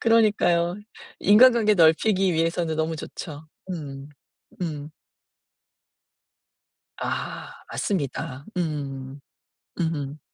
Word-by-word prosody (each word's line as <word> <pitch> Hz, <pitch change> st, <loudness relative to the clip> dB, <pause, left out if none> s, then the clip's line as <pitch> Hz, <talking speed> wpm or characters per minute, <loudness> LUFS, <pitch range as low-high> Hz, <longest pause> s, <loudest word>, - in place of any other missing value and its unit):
그러니까요. 205 Hz, -7 st, +3 dB, 0.5 s
인간관계 220 Hz, 0 st, +6 dB
넓히기 185 Hz, +3 st, +4 dB
위해서는 165 Hz, 0 st, 0 dB
너무 160 Hz, 0 st, -1 dB
좋죠. 155 Hz, 0 st, -8 dB, 0.2 s
음 140 Hz, -5 st, -6 dB, 0.5 s
음. 150 Hz, -3 st, -4 dB, 2.1 s
아 -, -, -4 dB, 0.2 s
맞습니다. 145 Hz, -, -3 dB
음. 140 Hz, -4 st, -3 dB, 0.6 s
으음. 150 Hz, -3 st, -2 dB
160 Hz, 175 characters per minute, -25 LUFS, 145-185 Hz, 2.1 s, 인간관계